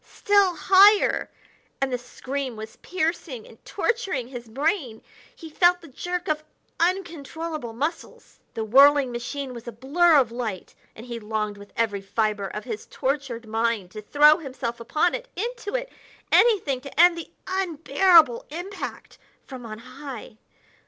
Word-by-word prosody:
Still 400 -3 +3
higher! 390 +6 +5 0.5
and 270 -1 -1
the - - +1
scream 255 +1 -5
was 220 0 -9
piercing 320 -9 -3
and 225 - -17
torturing 390 - -2
his 240 -3 -9
brain. 270 - -2 0.3
He 330 - -10
felt 350 +2 +4
the 335 - -12
jerk 355 +6 -4
of 305 0 -1 0.4
uncontrollable 330 -6 -2
muscles. 300 +8 -5 0.2
The 225 - -2
whirling 275 +3 +5
machine 255 +3 -5
was 235 0 -10
a - - -4
blur 305 +9 +3
of 255 -6 +4
light, 230 -6 -5 0.2
and 225 - -10
he 235 -2 -6
longed 210 -1 -3
with 205 0 -13
every 210 -4 0
fibre 210 0 -1
of 210 +2 -6
his 225 -4 -6
tortured 260 -4 -3
mind 225 -4 -1
to 215 - -8
throw 295 +7 +5
himself 255 -6 -5
upon 305 +9 +1
it - - -5
into 465 +1 -4
it! - - -3 0.4
anything 365 - +3
to 280 +1 -9
end 350 0 +7
the 335 - -7 0.2
unbearable 335 -6 +3
impact 355 +7 -7 0.3
from 255 -4 -9
on 215 -1 -7
high. 255 -2 -10
275 Hz, 150 wpm, -24 LUFS, 230-345 Hz, 0.5 s, end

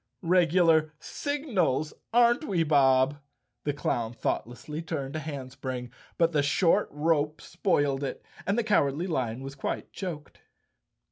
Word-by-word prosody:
"Regular 165 -3 +4
signals, 215 - -1 0.2
aren't 240 +3 +4
we, 180 - +1
Bob?" 140 -2 +4 0.5
The 145 - +1
clown 120 -5 -1
thoughtlessly 125 +6 -3
turned 145 -4 -4
a - - -1
handspring, 130 -4 -6 0.3
but 165 0 +3
the 150 -3 +2
short 165 +7 +2
rope 150 0 +1
spoiled 145 -6 0
it 140 - -5 0.2
and 200 +3 +1
the 235 - +2
Cowardly 165 -7 +2
Lion 130 -8 -2
was 135 0 -6
quite 135 - -4
choked. 170 -6 -7
150 Hz, 130 wpm, -28 LUFS, 135-175 Hz, 0.5 s, Regular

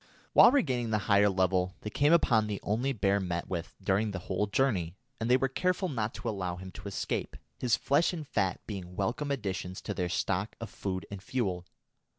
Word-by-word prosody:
While 240 - +9
regaining 130 - +1
the 110 - +2
higher 100 -1 +5
level, 95 -1 +1
they 105 - -5
came 145 +7 +3
upon 115 -10 +4
the 105 -2 -3
only 120 +6 0
bear 100 -5 +2
met 85 -3 -3
with 85 -2 -4
during 100 +2 +2
the 100 - -4
whole 100 +2 0
journey, 100 - +1 0.2
and 115 +1 -1
they 125 - +6
were 135 +1 +1
careful 180 +7 0
not 115 -5 -2
to - - -6
allow 95 -4 -2
him 95 +1 -9
to 95 - -9
escape, 100 - -3 0.2
his 120 -3 +3
flesh 145 +5 +2
and 160 -5 -6
fat 95 -7 0
being 90 -4 -7
welcome 120 +8 -1
additions 95 -8 -3
to - - -4
their 90 -1 -2
stock 95 +3 -1
of 115 - -7
food 95 -2 -4
and 100 -2 -6
fuel. 95 -7 -2
105 Hz, 200 wpm, -30 LUFS, 95-125 Hz, 0.2 s, While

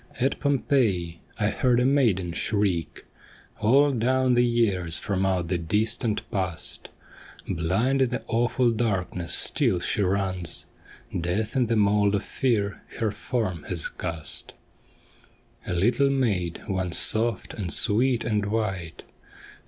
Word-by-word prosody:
At 135 +2 0
Pompeii 115 - +1 0.2
I 105 -1 +2
heard 125 -2 +2
a 125 - +2
maiden 110 -11 +2
shriek 95 -5 -1 0.5
All 140 +7 +4
down 130 +1 +2
the 120 0 +4
years 100 -9 +1
from 95 -1 -1
out 90 -3 0
the 90 -2 0
distant 110 +6 0
past; 90 -6 -4 0.6
Blind 95 +10 0
in 130 - +3
the 125 - -3
awful 120 +1 +1
darkness 95 -6 -2
still 120 - +2
she 95 - -1
runs; 95 -3 -1 0.5
Death 90 +8 -2
in 125 -3 +2
the 115 - +1
mould 105 -1 +3
of 100 - -1
fear 105 -6 -1 0.2
her 110 -2 0
form 105 - -3
has 85 -4 -1
cast. 80 -3 -6 1.1
A - - -1
little 120 +10 +3
maid 105 -11 -1
once 95 -3 -1
soft 115 0 0
and 95 -5 -4
sweet 120 +3 +2
and 105 -3 0
white. 95 -6 -3
105 Hz, 130 wpm, -25 LUFS, 90-120 Hz, 1.1 s, All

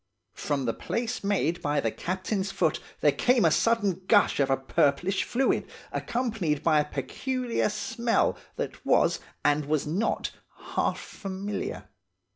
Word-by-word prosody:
From 140 -3 -2
the 115 - 0
place 235 -1 -3
made 180 -4 +1
by 145 -1 +1
the 115 -5 0
captain's 190 - -2
foot 165 -5 +1 0.2
there 145 - +5
came 245 - +3
a 165 - +5
sudden 205 -3 +2
gush 205 -7 +4
of 135 -1 +3
a 135 - +3
purplish 145 +7 +1
fluid, 265 +2 0 0.2
accompanied 225 - -1
by 155 -2 +4
a 150 0 -1
peculiar 250 - -1
smell, 230 +2 0 0.2
that - - -5
was, - - +3 0.3
and 145 0 +3
was 150 0 0
not, 180 +10 -1 0.4
half - - +1
familiar. 195 +1 -5
190 Hz, 140 wpm, -27 LUFS, 150-225 Hz, 0.4 s, there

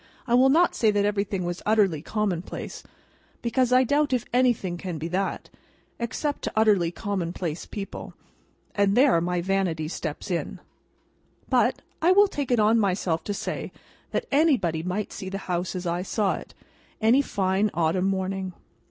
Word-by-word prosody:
I 235 - -1
will 255 +2 +6
not 335 +5 +4
say 220 - +2
that 205 -1 +2
everything 200 -2 -1
was 175 0 -4
utterly 200 -8 +2
commonplace, 190 -2 -3 0.6
because 250 +1 +1
I 255 +1 +6
doubt 285 +2 +1
if 245 -2 0
anything 240 -8 +2
can 175 -1 -5
be 155 +2 -4
that, 190 +2 -2 0.5
except 285 +5 -2
to - - -4
utterly 210 -6 +4
commonplace 175 -4 -4
people—and 200 0 -4
there 255 -10 +5
my 175 0 -1
vanity 180 -4 0
steps 160 +3 -5
in; 170 - -3 0.9
but, - - +2 0.2
I 350 +3 +5
will 405 +2 +6
take 285 -8 -4
it 245 -2 +3
on 215 +2 +4
myself 185 -5 0
to 205 - -2
say - - -4 0.4
that 485 - -2
anybody 270 - +2
might 185 +4 -3
see 190 - -6
the 195 - -4
house 180 +1 -2
as 180 0 -4
I 175 +1 -1
saw 195 +1 0
it, - - -9 0.4
any 230 +5 +4
fine 195 -4 0
autumn 170 +3 +1
morning. 190 -1 -2
195 Hz, 160 wpm, -25 LUFS, 180-235 Hz, 0.9 s, will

